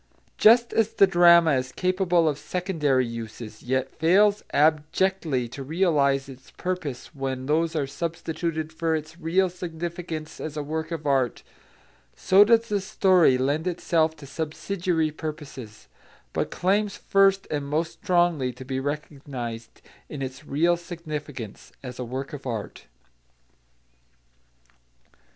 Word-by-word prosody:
Just 235 +2 +6
as 225 -1 +2
the 195 - +7
drama 170 -2 +6
is 130 -1 -1
capable 180 -1 +1
of 150 -2 0
secondary 155 -8 0
uses, 115 -1 -8
yet 130 +1 0
fails 200 +6 +3
abjectly 155 -1 +1
to 135 - -8
realise 140 -3 +1
its 130 -1 -13
purpose 175 -9 -5
when 135 -2 -4
those 160 +3 +1
are 150 -3 +1
substituted 160 +1 -4
for 160 0 0
its 155 +2 -6
real 180 +3 +2
significance 170 -2 -6
as 155 -1 -5
a 150 - -2
work 160 +2 -3
of 165 -3 -5
art, 135 -4 +1 0.7
so 195 +2 +6
does 230 +1 +3
the 205 -2 0
story 185 -8 +4
lend 145 +6 0
itself 165 -2 +1
to 150 - -12
subsidiary 160 +2 -2
purposes, 145 -8 -8 0.5
but - - -1
claims 200 +2 0
first 195 0 +3
and 145 -2 -2
most 160 +3 -1
strongly 175 -7 +2
to 125 +2 -11
be 130 0 -2
recognised 135 -5 -6 0.3
in 145 -3 -5
its 130 +3 -7
real 170 +5 +2
significance 150 - -7
as 125 -1 -8
a - - -2
work 130 +4 -5
of 140 -2 -7
art. 115 -4 -5
155 Hz, 135 wpm, -25 LUFS, 135-175 Hz, 0.7 s, the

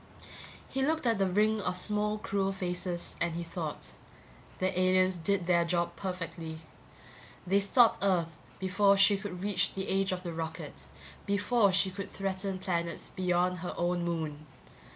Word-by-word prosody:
He 270 - -2
looked 315 0 0
at 230 -3 +2
the 195 - +3
ring 215 +3 +2
of 180 - -1
small 210 +2 +1
cruel 195 -2 -1
faces 180 -1 -3
and 170 -1 0
he 170 - -3
thought: 165 -2 -5 0.7
The 185 0 0
aliens 185 0 +3
did 180 +2 0
their 170 -1 +4
job 170 0 -1
perfectly; 170 -4 -5 0.8
they 195 +3 +3
stopped 225 +4 +4
Earth 170 -5 +1 0.2
before 195 +1 +3
she 200 +1 +6
could 195 -2 -6
reach 185 -3 0
the 190 0 -3
age 195 0 +1
of 185 0 -3
the 170 -2 -4
rocket, 160 -1 -6 0.4
before 205 +1 +3
she 190 +1 +2
could 200 +1 -6
threaten 195 0 -3
planets 170 -3 -3
beyond 180 0 +1
her 180 0 -5
own 175 0 0
moon. 155 -3 -3
185 Hz, 155 wpm, -30 LUFS, 175-200 Hz, 0.8 s, she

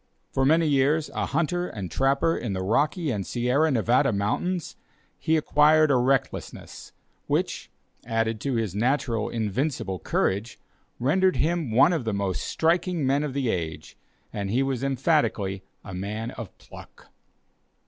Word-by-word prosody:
For 135 - +1
many 160 +2 +4
years 145 +2 +2
a - - -2
hunter 175 +2 0
and 100 -6 -6
trapper 140 +5 +2
in 115 -5 -3
the 95 0 -3
Rocky 150 - +1
and 100 -4 -2
Sierra 125 +9 +1
Nevada 120 -2 +2
Mountains, 150 - -2 0.4
he 160 0 +2
acquired 155 0 +4
a - - +4
recklessness, 130 +1 -2 0.4
which, - - -1 0.3
added 115 -1 -1
to 135 -3 -1
his 110 -5 -1
natural 120 0 0
invincible 110 - -2
courage, 100 +8 -1 0.4
rendered 185 +9 +2
him 165 -3 0
one 130 +10 +5
of 160 -7 -1
the 110 - -1
most 100 -2 -2
striking 170 -1 0
men 135 +2 +2
of 140 -3 -4
the 135 -4 0
age, 80 -5 -4 0.4
and 100 -2 -3
he 125 +6 +2
was 135 -2 -2
emphatically 130 - 0 0.2
a 95 - -9
man 105 +5 -4
of 115 -6 -9
pluck. - - -14
130 Hz, 150 wpm, -25 LUFS, 110-155 Hz, 0.4 s, one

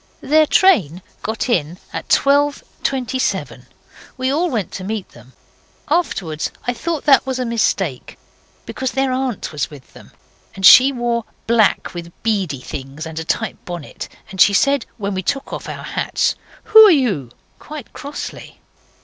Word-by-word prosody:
Their 310 +1 +3
train 190 - +3 0.2
got 220 +3 -3
in 175 - 0 0.2
at - - -5
12.27. 275 -2 0 0.5
We 260 0 0
all 345 +4 +1
went 220 - -2
to 185 - -6
meet 210 0 -4
them. 120 +2 -17 0.6
Afterwards 190 - -1 0.2
I 245 - 0
thought 320 +4 -3
that 275 -2 +5
was 260 -1 -1
a 255 - -2
mistake, 195 - -1 0.5
because 260 -1 -4
their 270 0 +1
aunt 255 -4 -2
was 150 -4 -2
with 145 -4 -14
them, - - -15 0.5
and 190 -1 -1
she 260 +7 +9
wore 240 -3 -2 0.2
black 225 -4 +2
with 170 -1 -7
beady 195 - -1
things 135 +4 -7
and 160 0 -6
a - - -4
tight - - -3
bonnet, 175 -4 -7 0.2
and 190 -1 -1
she 200 - +6
said, 280 +2 +2
when 200 -2 -3
we 190 - -2
took 275 +8 -3
our - - -3 0.2
hats - - 0
off - - -26
'Who 440 0 +10
are - - +7
you?' 225 - +1 0.3
quite 300 -5 -10
crossly. 290 0 -8
230 Hz, 160 wpm, -19 LUFS, 175-275 Hz, 0.6 s, Who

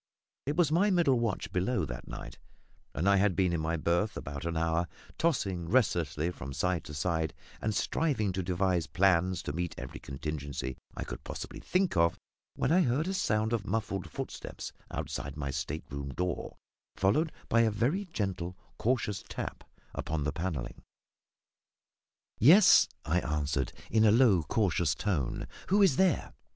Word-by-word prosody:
It 145 - 0
was 165 -3 +3
my 185 +6 +4
middle 165 -10 +3
watch 115 -4 -2
below 95 +7 0
that - - -7
night, - - -8 0.6
and 85 +8 0
I 100 0 +6
had 95 -1 +3
been 90 -1 +2
in 85 - 0
my 80 +2 0
berth 85 +6 0
about 70 +1 -6
an 85 -1 -1
hour, 80 +1 +1 0.3
tossing 95 - 0
restlessly 85 - +2
from 70 -5 -7
side 90 +1 0
to 75 - -7
side, 80 +1 -1 0.3
and 110 -1 -1
striving 125 -6 +1
to 95 +1 -2
devise 90 -1 0
plans 90 -1 +2
to 70 - -4
meet 85 +1 -3
every - - -7
contingency 70 -2 -4 0.2
I - - -2
could - - -7
possibly - - -6
think 185 - +1
of, 85 0 +3 0.4
when - - 0
I 180 +3 +5
heard 150 +2 +1
a 190 - -1
sound 110 - +1
of 105 -3 -1
muffled 100 -4 -2
footsteps - - -6 0.2
outside 70 0 -4
my 70 -2 -2
state 75 +3 -4
room 70 0 -4
door, 90 +6 -3 0.4
followed 150 +12 +2 0.2
by 115 - +4
a 115 - +4
very 125 - 0
gentle 95 - -3 0.2
cautious 110 -4 0
tap - - -5 0.3
upon 75 -1 -2
the 75 0 -1
panelling. 80 -8 -4 1.6
"Yes," 170 - +8 0.2
I 80 +3 +2
answered, 75 -4 -1 0.2
in 110 -1 +4
a 105 - +7
low 110 -6 +5
cautious 85 -1 +1
tone; 75 -12 -1 0.2
"who 200 +2 +4
is 150 -9 +4
there?" 185 -5 +2
90 Hz, 165 wpm, -30 LUFS, 80-115 Hz, 1.6 s, Yes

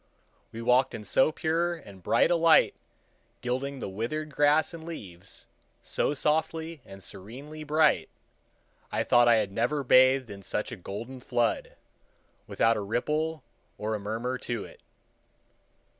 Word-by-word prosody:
We 115 +1 -7
walked 125 +2 +3
in 105 - -7
so 130 +8 +3
pure 170 +2 0
and 100 - -13
bright - - +3
a - - +5
light, 165 -1 +5 0.7
gilding 130 +3 -2
the - - -5
withered 120 +11 -4
grass 150 +4 +3
and 165 -1 -8
leaves, 95 - -8 0.4
so 145 - 0
softly 160 +1 0
and 95 0 -12
serenely 130 +13 -8
bright, 150 0 +3 0.8
I - - 0
thought 120 0 +5
I 120 - +7
had 105 -3 0
never 125 +8 0
bathed 130 -1 +5
in 100 -1 -9
such 105 - -3
a - - -4
golden 115 +7 -7
flood, 120 -2 -1 0.7
without 115 0 +2
a - - -2
ripple 150 +8 -1 0.3
or 110 +1 -2
a 105 - -2
murmur 115 +5 -3
to 120 -4 -4
it. - - -15
130 Hz, 145 wpm, -28 LUFS, 110-155 Hz, 0.8 s, I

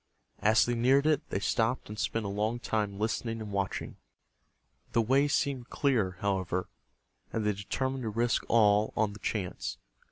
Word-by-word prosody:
As 110 +1 +4
they 120 - 0
neared 130 +4 +3
it, 155 -1 +1
they - - -1
stopped 115 +5 0
and 105 +1 -7
spent 115 0 -1
a - - -1
long 105 +4 -1
time 105 -4 -2
listening 115 +2 -2
and 105 -2 -6
watching. 100 -1 -3 1.0
The 115 - +4
way 135 +5 +3
seemed 135 -3 -1
clear, 110 - +1
however, 95 -2 -1 0.6
and 110 -2 -2
they 105 - +2
determined 130 +7 -2
to 115 - -2
risk 115 +2 +1
all 105 -2 +4
on 105 -1 +1
the 105 - -11
chance. 95 -5 -3
110 Hz, 165 wpm, -30 LUFS, 100-120 Hz, 1.0 s, As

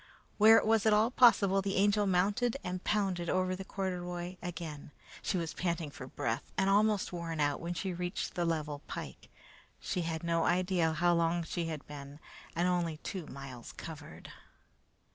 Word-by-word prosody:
Where 220 +2 +9
it - - +2
was 220 -1 +3
at 215 - +6
all 220 +3 +4
possible, 200 -6 +5
the 195 0 -2
Angel 205 +1 +3
mounted 205 +7 +2
and 180 0 -4
pounded 190 -5 0
over 185 0 +1
the 190 - -6
corduroy 180 -2 -4
again. 160 -5 -6 0.3
She - - -1
was 165 -3 -3
panting 170 -4 -2
for 135 -3 -9
breath 115 -3 -3
and 190 +1 +3
almost 210 -1 +2
worn 165 -2 -4
out 145 -1 +1
when 175 +1 -3
she 190 +1 -2
reached 175 +1 -3
the 175 - -1
level 155 -3 -2
pike. - - -7 0.5
She 180 - -2
had 165 -1 -3
no 165 -1 +1
idea 180 -2 +2
how 175 +2 +3
long 170 0 +1
she 170 +1 -3
had 155 -3 -5
been 145 0 -9 0.4
and 175 +2 +2
only 175 -3 0
two 180 0 -6
miles 130 -3 -9
covered. 160 -2 -9
175 Hz, 175 wpm, -32 LUFS, 160-195 Hz, 0.5 s, Where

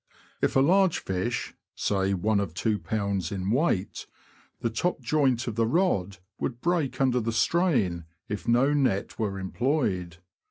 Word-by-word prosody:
If - - +1
a 135 - +5
large 185 +4 +4
fish 95 +5 -3 0.2
(say, 95 -1 0
one 105 +3 +1
of 90 -5 -3
2lb. 100 -2 -1
weight), 125 - 0 0.5
the 115 - -1
top 175 +10 -1
joint 130 -2 +1
of 120 - -3
the 115 +1 +1
rod 110 - +1 0.2
would 120 -2 -3
break 165 -3 0
under 130 -2 +3
the 115 0 -1
strain 110 - +1 0.2
if 105 - -5
no 125 +5 +4
net 130 -9 0
were 100 -3 -1
employed. 95 - -1
115 Hz, 145 wpm, -27 LUFS, 95-135 Hz, 0.5 s, a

